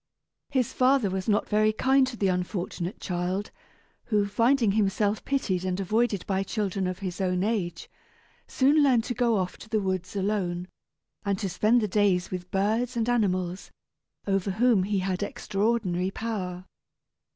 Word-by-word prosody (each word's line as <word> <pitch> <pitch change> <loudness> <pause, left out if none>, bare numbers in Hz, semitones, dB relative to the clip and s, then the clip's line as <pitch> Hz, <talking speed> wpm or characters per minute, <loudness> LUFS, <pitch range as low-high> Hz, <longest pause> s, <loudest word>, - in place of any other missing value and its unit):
His 260 -3 0
father 255 -5 +3
was 190 +2 -2
not 210 - +2
very 215 0 +3
kind 265 +4 +3
to 250 -2 -6
the 200 - +1
unfortunate 180 0 -3
child, 180 +2 -2 0.5
who, 210 -3 +1
finding 230 +2 +2
himself 205 0 +1
pitied 200 -10 0
and 185 0 -2
avoided 210 +1 0
by 195 -1 0
children 195 -2 -2
of 185 0 -3
his 185 +1 -4
own 180 -1 +1
age, 195 -6 -2 0.6
soon 285 +3 +3
learned 255 -5 +4
to 245 - -3
go 235 -1 +2
off 185 -1 -2
to 215 - -12
the 220 - +1
woods 185 -1 -3
alone, 190 -3 -1 0.6
and 200 -1 0
to 195 - -2
spend 215 +6 +2
the 210 - 0
days 195 -2 +1
with 180 -1 -5
birds 225 +6 0
and 230 +1 0
animals, 185 -6 0 0.6
over 195 -1 0
whom 220 +1 +3
he 205 0 0
had 190 0 -1
extraordinary 205 -4 -1
power. 190 -4 -4
200 Hz, 160 wpm, -27 LUFS, 185-225 Hz, 0.6 s, learned